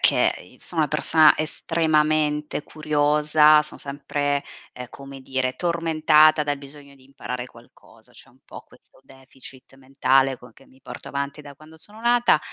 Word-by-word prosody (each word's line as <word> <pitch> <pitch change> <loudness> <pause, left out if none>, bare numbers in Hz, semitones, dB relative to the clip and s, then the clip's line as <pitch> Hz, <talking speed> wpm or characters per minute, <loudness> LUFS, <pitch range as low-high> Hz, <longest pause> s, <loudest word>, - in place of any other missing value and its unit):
che - - 0
sono 165 -3 -3
una 150 - -1
persona 155 +1 +5
estremamente 155 -2 -1
curiosa, 150 0 +2
son 150 - -7
sempre, 145 0 -3 0.3
ehm, 125 -1 -9
come 135 -1 -12
dire 130 -1 -3
tormentata 155 -2 +3
dal 145 -1 -3
bisogno 140 0 -13
di 130 -1 -23
imparare 125 -2 -7
qualcosa, 120 -1 -19
c'è - - -14
un - - -26
po' - - -11
questo - - -23
deficit 130 0 -15
mentale 135 0 +1
con 125 -2 -17
che 135 - -22
mi 130 - -24
porto - - -10
avanti 140 +1 -5
da 145 -1 -13
quando 155 +2 -17
sono 210 +6 -17
nata; 240 -6 +3
145 Hz, 155 wpm, -22 LUFS, 135-155 Hz, 0.3 s, persona